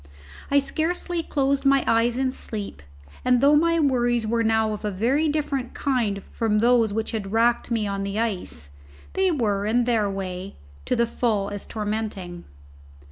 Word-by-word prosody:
I 285 - +3
scarcely 335 +4 -1
closed 280 -3 0
my 275 -1 +4
eyes 230 +1 +2
in 260 0 +1
sleep, 210 - -6 0.4
and 250 -1 +3
though 285 +3 +5
my 335 +2 +3
worries 240 -5 +2
were 230 +1 +1
now 220 -1 +2
of 210 - -7
a 210 - 0
very 250 +11 +1
different 280 -4 -2
kind 225 -8 -1
from 220 -2 0
those 230 -1 +3
which 220 +1 -2
had 200 -3 -4
racked 235 +2 +2
me 225 -3 0
on 200 -1 -2
the 200 +1 -3
ice, 180 - -3 0.4
they 380 0 +2
were, 210 - 0
in 240 +3 +2
their 225 -4 +1
way, 190 -1 -5 0.3
to - - 0
the 235 0 +2
full 220 -4 -1
as 205 -1 -6
tormenting. 210 -5 -4
230 Hz, 170 wpm, -24 LUFS, 205-265 Hz, 0.4 s, though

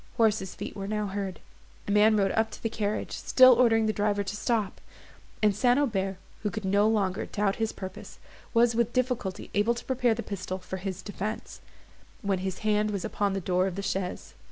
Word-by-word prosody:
Horses' 220 -5 +2
feet - - -6
were 195 -1 -5
now 210 0 -1
heard; 195 -3 -4 0.5
a - - -1
man 210 +1 +5
rode 195 -1 +2
up 220 0 +1
to - - -11
the 225 - 0
carriage, 210 -1 -2
still 255 -1 +6
ordering 225 -2 +4
the 215 - +1
driver 205 -1 0
to 200 +1 -4
stop; 215 -2 -1 0.6
and 210 -2 +4
St. 245 +4 +3
Aubert, 195 -9 0 0.2
who 210 - -1
could 205 +2 -5
no 200 +2 +3
longer 200 -4 0
doubt 200 -1 0
his 225 -1 0
purpose, 190 -1 -9 0.3
was 235 0 +4
with 235 0 0
difficulty 250 -7 -2
able 215 +4 +2
to 240 - -8
prepare 250 -3 +2
a - - -4
pistol 195 -5 -4
for 190 0 -6
his 190 0 -5
defence, 210 +2 -5 0.6
when 195 -2 0
his 190 0 -3
hand 210 0 +2
was 200 -2 -3
upon 205 -2 0
the 195 - -1
door 185 +1 +1
of 185 - -4
the 200 - -4
chaise. 190 -1 -3
210 Hz, 205 wpm, -28 LUFS, 195-225 Hz, 0.6 s, still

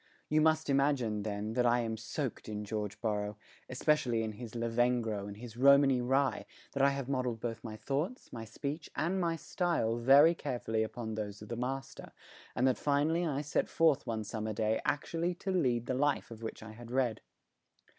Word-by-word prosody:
You 155 +1 +3
must 155 0 +3
imagine, 135 -6 +1
then, 105 +1 -3
that 125 0 +2
I 120 +1 +3
am 115 -1 -2
soaked 110 +3 -4
in 105 0 -4
George 105 -1 -4
Borrow, 105 -2 -1 0.3
especially 125 -4 +1
in 110 - -2
his 115 +1 -9
Lavengro 115 -3 0
and 100 0 -8
his 115 0 -9
Romany 135 -1 +6
Rye, 135 +2 +1 0.2
that 140 - -1
I 140 - +6
have 140 -2 -3
modelled 125 -4 -1
both 115 -1 -4
my 110 -2 -6
thoughts, 145 - -3
my 115 -2 -5
speech 145 +7 -5
and 185 +4 0
my 170 -1 +1
style 165 -9 0
very 140 +7 +7
carefully 120 -8 -2
upon 110 0 -3
those 105 -1 -5
of 105 - -12
the 120 - -3
master, 135 +3 -5 0.4
and 125 - +2
that 130 - +1
finally 155 +4 +2
I 145 -2 -1
set 150 - -1
forth 155 -4 +3
one 110 -1 -2
summer 110 0 -3
day 110 +1 0
actually 170 +4 -1
to 190 +2 -3
lead 125 -10 +1
the 130 - -1
life 140 -1 0
of 115 -1 -9
which 110 -1 -6
I 110 - -9
had 115 +1 -11
read. 125 -3 0
125 Hz, 190 wpm, -32 LUFS, 110-140 Hz, 0.4 s, very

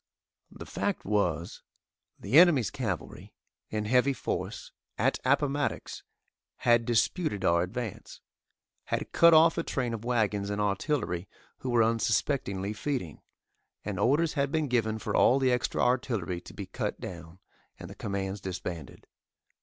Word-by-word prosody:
The - - -10
fact 205 - -3
was, 90 -5 -1 0.6
the 145 - +5
enemy's 165 - +5
cavalry, 110 - -5 0.3
in 105 -1 -2
heavy 125 +5 +3
force, - - -4 0.3
at - - +1
Appomattox, 140 +1 0 0.5
had 120 -1 +3
disputed 120 - 0
our 85 0 +4
advance 110 +4 -5 0.7
had - - -3
cut 170 -1 +6
off 165 +1 +5
a - - 0
train 125 -6 -2
of 115 -1 -5
wagons 105 -4 0
and 105 0 -2
artillery 100 - -1 0.3
who 130 - -4
were 120 -2 +4
unsuspectingly 110 -3 0
feeding, 110 - -4 0.6
and - - -3
orders 150 +6 +2
had 140 -2 0
been 155 -1 0
given 110 -4 0
for 110 -1 -3
all 130 - +5
the 130 -2 +2
extra 125 - 0
artillery 115 -8 0
to - - -13
be - - -5
cut - - -4
down, 85 -1 -8 0.4
and - - -9
the - - -9
commands 100 0 -4
disbanded. 90 -6 -6
115 Hz, 140 wpm, -29 LUFS, 100-135 Hz, 0.7 s, cut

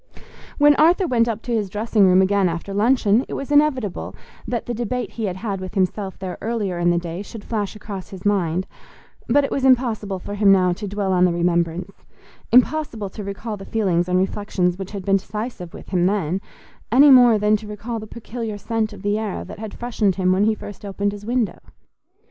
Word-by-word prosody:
When 295 0 +6
Arthur 345 +5 +4
went 240 -7 +2
up 225 -1 -3
to 245 - -5
his 210 -4 0
dressing 210 0 +2
room 185 +1 +5
again 195 -1 +2
after 170 +4 -5
luncheon, 220 +1 +3
it - - -5
was 275 +1 -5
inevitable 280 -9 +1 0.3
that 240 -2 -2
the 240 - -3
debate 240 +2 -3
he 225 - -4
had 185 -3 -2
had 195 -2 -4
with 185 +2 -7
himself 190 +1 -1
there 185 -2 -6
earlier 210 -6 -2
in 175 0 +2
the 175 - +2
day 170 +1 -4
should 205 +1 -9
flash 210 -3 -3
across 200 -3 -8
his 190 -1 -10
mind; 185 -3 +1 0.6
but 285 +5 +4
it 275 - -2
was 275 - -1
impossible 235 -7 +2
for 195 +2 -7
him 205 -1 +4
now 185 -2 +4
to 205 +3 -6
dwell 200 -1 -1
on 180 0 +3
the 180 - +2
remembrance—impossible 185 - -1
to 210 - -7
recall 205 +2 -5
the 195 - -9
feelings 185 -5 0
and 180 - +2
reflections 185 -2 0
which 195 -1 -5
had 200 -3 -7
been 195 0 +4
decisive 210 -2 -6
with - - -12
him 180 -1 +2
then, 190 -2 -1 0.5
any 275 +4 +7
more 245 -4 +7
than 210 +1 +3
to 210 0 -11
recall 225 +3 -5
the 215 - -9
peculiar 225 -1 -6
scent 220 0 -2
of 200 -1 -12
the 205 +1 0
air 215 -3 -4
that - - -10
had 220 -1 -6
freshened 220 -5 -1
him 185 -1 +1
when 190 +2 +3
he 220 0 +2
first 205 -1 -10
opened 200 0 -2
his 205 +1 -9
window. 240 -3 -1
205 Hz, 210 wpm, -21 LUFS, 190-230 Hz, 0.6 s, any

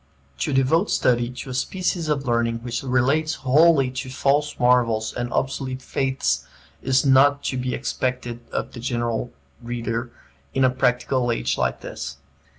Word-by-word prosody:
To - - -1
devote 135 +8 +2
study 120 -1 +2
to 125 +1 -7
a - - -4
species 180 +4 -1
of 140 -2 0
learning 115 -1 0
which 120 -1 -3
relates 140 +5 +1
wholly 140 -1 +5
to 130 +1 -5
false 145 +3 0
marvels 120 -3 +2
and 120 0 -3
obsolete 130 -1 -2
faiths 135 0 0 0.4
is 130 +1 +2
not 140 +1 +5
to 130 - -2
be 125 0 -2
expected 125 -2 -3
of - - -3
the 120 - -9
general 120 -1 -2 0.3
reader 120 0 -3 0.4
in 135 - +3
a 130 - +4
practical 125 0 +1
age 60 - 0
like 60 0 -1
this. 65 - -6
130 Hz, 155 wpm, -23 LUFS, 120-135 Hz, 0.4 s, wholly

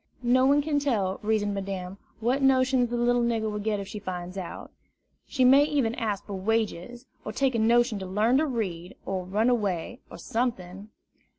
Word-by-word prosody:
No 255 +2 +4
one 285 +1 +4
can 295 -1 0
tell, 210 -10 -1
reasoned 210 -1 0
Madame, 195 -1 -5 0.2
what 250 +5 +1
notions 260 -2 +3
the 240 - -2
little 240 0 +2
nigger 225 -2 0
will 210 - -4
get 210 0 -1
if 195 - -6
she 210 - -7
finds 180 -2 -6
it - - -4
out. 180 - -8 0.6
She 260 -3 +1
might 275 +3 +6
even 275 -7 0
ask 210 -5 -3
for 205 - -7
wages, 225 +3 -2 0.2
or 215 - -5
take 265 +3 0
a 230 - 0
notion 235 0 +3
to 190 - -6
learn 215 +7 +2
to 315 - +1
read, 190 - -4
or 190 -1 -3
run 205 +5 0
away, 210 -2 -1
or - - -10
something. 210 -5 -3
220 Hz, 195 wpm, -27 LUFS, 195-250 Hz, 0.6 s, might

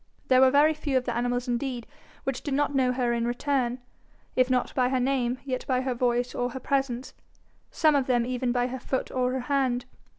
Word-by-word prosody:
There 255 0 +6
were 265 - +7
very 290 +3 +5
few 295 -3 -1
of 255 - -1
the 240 - -2
animals 245 +1 -1
indeed 245 -1 -2 0.4
which 270 -2 -3
did 280 -3 -2
not 290 0 +1
know 260 -2 +2
her 245 -1 0
in 235 0 0
return, 250 0 0 0.6
if 255 0 +3
not 250 -1 0
by 250 -1 +2
her 260 -1 +1
name, 250 -1 0
yet 255 -2 -3
by 255 -1 +1
her 260 -1 -1
voice 245 0 0
or 245 0 -1
her 260 - -6
presence 265 -2 -2 0.6
some 310 -1 +3
of 275 -3 +1
them 240 -2 +2
even 250 0 -1
by 245 0 +1
her 255 +1 -4
foot 260 +2 -3
or 250 -1 0
her 260 0 -2
hand. 255 -2 0
255 Hz, 220 wpm, -27 LUFS, 245-270 Hz, 0.6 s, were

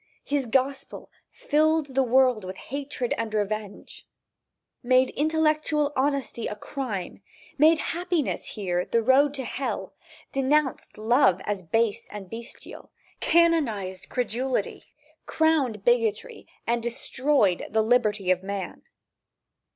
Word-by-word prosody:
His 280 -3 -1
gospel 265 +3 -1 0.2
filled 310 -1 +1
the 270 - +3
world 255 -3 +3
with 185 +1 -7
hatred 275 -3 -4
and 225 -1 -2
revenge; 210 -1 -4 0.7
made 255 +1 +3
intellectual 305 -1 +1
honesty 270 -4 -1
a 210 - -4
crime; 210 -6 -5 0.4
made 315 +2 +6 0.2
happiness 350 -3 -1
here 180 -4 -1
the 230 +3 0
road 275 +4 +4
to 265 - -4
hell, 265 +2 -4 0.4
denounced 275 +1 0
love 215 -4 +3
as 205 -2 -2
base 220 +5 0
and 200 -3 -9
bestial, 230 +1 -9 0.3
canonized 260 - +1
credulity, 250 -1 -2 0.4
crowned 280 -10 +1
bigotry 230 -3 0 0.2
and 235 0 0
destroyed 240 -3 0
the 220 0 +2
liberty 215 -5 +2
of 185 0 +1
man. 195 -1 -5
250 Hz, 110 wpm, -26 LUFS, 210-285 Hz, 0.7 s, made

